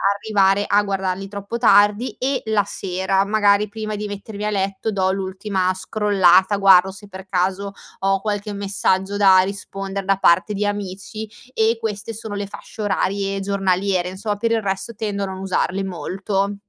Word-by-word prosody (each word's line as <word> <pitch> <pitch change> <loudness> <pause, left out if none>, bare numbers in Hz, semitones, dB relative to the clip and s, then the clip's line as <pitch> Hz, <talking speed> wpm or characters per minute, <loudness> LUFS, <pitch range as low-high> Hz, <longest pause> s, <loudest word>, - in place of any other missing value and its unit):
arrivare 200 -1 +2
a 205 +1 +3
guardarli 195 -1 -2
troppo 200 +3 -5
tardi, 210 +1 +4
e 265 +1 -1
la 215 -2 +2
sera, 190 0 -1
magari 205 0 +3
prima 215 0 -5
di 210 0 -4
mettermi 205 +1 -6
a 210 - +1
letto 195 +1 -2
do 190 -1 +1
l'ultima 190 0 -1
scrollata, 190 0 +3
guardo 190 -1 +6
se 200 +2 -13
per 190 0 -9
caso 190 +2 -1 0.3
ho 195 0 +1
qualche 210 -1 -3
messaggio 195 0 0
da 190 -2 +6
rispondere 195 0 -5
da 195 0 +3
parte 190 +3 +3
di 205 +1 -1
amici. 205 +2 -5 0.2
E 225 +1 +2
queste 220 0 -4
sono 220 -1 -7
le 200 0 -3
fasce 215 - -10
orarie 195 -1 -1
giornaliere 195 -2 0
insomma. 205 +2 -3
Per 230 +2 -1
il 225 -1 +2
resto 195 +3 -3
tendo 205 -2 -3
a - - 0
non 190 0 -6
usarli 190 0 -1
molto. 195 +2 -2
200 Hz, 165 wpm, -21 LUFS, 190-205 Hz, 0.3 s, guardo